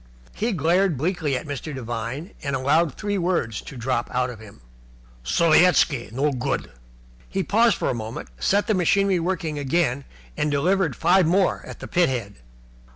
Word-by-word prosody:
He 225 +3 -1
glared 175 -1 +2
bleakly 155 -2 -1
at - - -7
Mr. 145 0 -5
Devine, 120 - -5
and 140 -1 -2
allowed 145 +3 +2
three 205 -2 -2
words 170 - -1
to 135 - -10
drop 120 0 -1
out 125 0 0
of 115 - -11
him. 105 - -14 0.6
"Sovietski 155 - +3
no 140 +5 0
good!" 130 +1 -3 0.6
He 195 - -1
paused 225 +3 +3
for - - -2
a - - -1
moment, 110 - -6
set 200 - +2
the 215 - +1
machinery 195 +1 +2
working 165 -3 -2
again, 140 -2 0 0.3
and 150 - 0
delivered 160 +2 +1
five 180 -1 +3
more 185 +3 +2
at - - -10
the - - -6
pithead. 130 - 0
150 Hz, 160 wpm, -23 LUFS, 130-180 Hz, 0.6 s, Sovietski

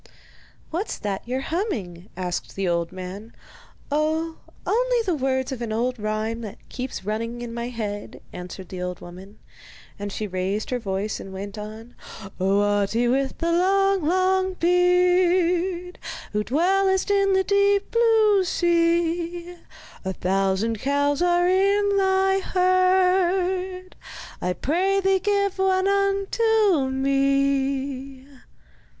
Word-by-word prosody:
'What's 355 +7 -3
that 200 -2 -3
you're 255 +2 -2
humming?' 215 - -4
asked 180 -1 -4
the 195 -1 -1
old 170 0 0
man. 185 +4 -8 0.6
'Oh, 315 +2 0 0.3
only - - +1
the 365 - +1
words 260 -2 -1
of 255 -3 -5
an 230 -2 -3
old 245 +2 -1
rhyme 215 +2 -2
that 210 -3 -7
keeps 250 -6 -6
running 230 +3 -3
in 235 -1 -6
my 235 0 -4
head,' 210 -4 -5
answered 180 +1 -8
the 185 -1 -6
old 180 -1 -4
woman; 190 +4 -12 0.6
and 205 0 -4
she 215 - -4
raised 190 +3 -3
her 250 - 0
voice 200 -1 -3
and 195 - -9
went 195 +1 -7
on: 220 +3 -9 0.5
Oh, 195 +2 +2
Ahti, 205 +3 +1
with 265 +1 0
the 335 0 -1
long, 390 +1 +2
long 375 +3 +2
beard, 360 0 +2 0.3
Who 210 0 0
dwellest 380 - +2
in 395 -1 +3
the 380 0 +3
deep 400 0 +2
blue 445 -4 +4
sea, 345 0 0 0.5
A 190 -1 -3
thousand 195 +4 0
cows 285 +3 +1
are 350 0 +3
in 400 +2 +3
thy 385 0 +3
herd, 370 0 +1 0.5
I 180 - 0
pray 370 - +1
thee 385 0 +2
give 400 -1 0
one 380 0 +2
onto 395 - +2
me. 275 0 0
310 Hz, 130 wpm, -24 LUFS, -, 0.6 s, blue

